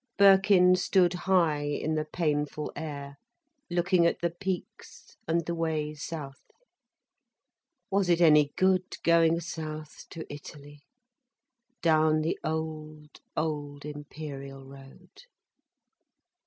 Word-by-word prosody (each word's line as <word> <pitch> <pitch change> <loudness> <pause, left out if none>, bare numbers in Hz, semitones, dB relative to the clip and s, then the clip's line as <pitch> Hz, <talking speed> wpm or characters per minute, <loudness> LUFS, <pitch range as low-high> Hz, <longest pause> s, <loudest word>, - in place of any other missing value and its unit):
Birkin 195 -2 +6
stood 180 -1 +2
high 175 -5 +2
in 145 +2 -2
the 155 0 -1
painful 150 -2 -2
air, 145 -2 -6 0.5
looking 175 0 +2
at - - -1
the 170 -1 -1
peaks, 185 +1 -6
and 165 0 0
the 170 - -2
way 160 -2 -2
south. 145 -2 -7 1.5
Was 195 -2 +1
it 170 -1 +4
any 150 -4 +5
good 185 -1 +1
going 170 0 +4
south, 155 -2 -7
to 165 -2 -7
Italy? 145 0 -11 1.0
Down 155 -1 +3
the 160 +2 -2
old, 155 -1 -5 0.2
old 145 -2 -3
Imperial 145 -2 -8
road? 140 - -15
155 Hz, 105 wpm, -28 LUFS, 150-175 Hz, 1.5 s, Birkin